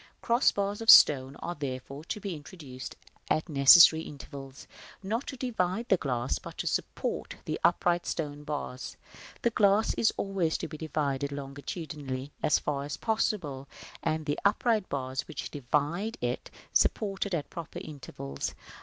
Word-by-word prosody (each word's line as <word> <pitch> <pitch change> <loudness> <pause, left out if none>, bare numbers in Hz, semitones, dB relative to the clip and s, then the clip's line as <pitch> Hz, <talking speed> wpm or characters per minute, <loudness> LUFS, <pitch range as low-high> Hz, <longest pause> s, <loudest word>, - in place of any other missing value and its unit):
Cross 235 +3 +4
bars 200 +1 -2
of 225 - -2
stone 135 -1 +8
are, 175 - -2
therefore, 140 -1 -6
to 210 - -4
be 195 -4 -4
introduced 145 -5 -9 0.3
at 155 - +1
necessary 160 +2 +8
intervals, 140 -2 -9 0.4
not 225 +7 -2
to 265 - -5
divide 230 -3 -1
the 190 - +5
glass, 125 -5 -1
but - - -10
to - - -3
support - - -2
the 155 - -3
upright 175 0 +2
stone 145 -2 -3
bars. 145 -4 -5 0.5
The 235 - +3
glass 205 +1 +3
is 225 - +2
always 190 -5 0
to - - -4
be 155 -1 -9
divided 140 -3 -1
longitudinally 140 -1 -6
as - - +4
far 140 -2 -2
as 145 +1 -5
possible, 185 - -1 0.3
and 155 0 -1
the 145 -1 -1
upright 215 0 +2
bars 130 -1 -3
which - - -6
divide 150 - -1
it - - -3 0.2
supported 200 -2 +1
at 150 - -4
proper 170 -2 -7
intervals. 100 - -6
155 Hz, 150 wpm, -29 LUFS, 140-195 Hz, 0.5 s, stone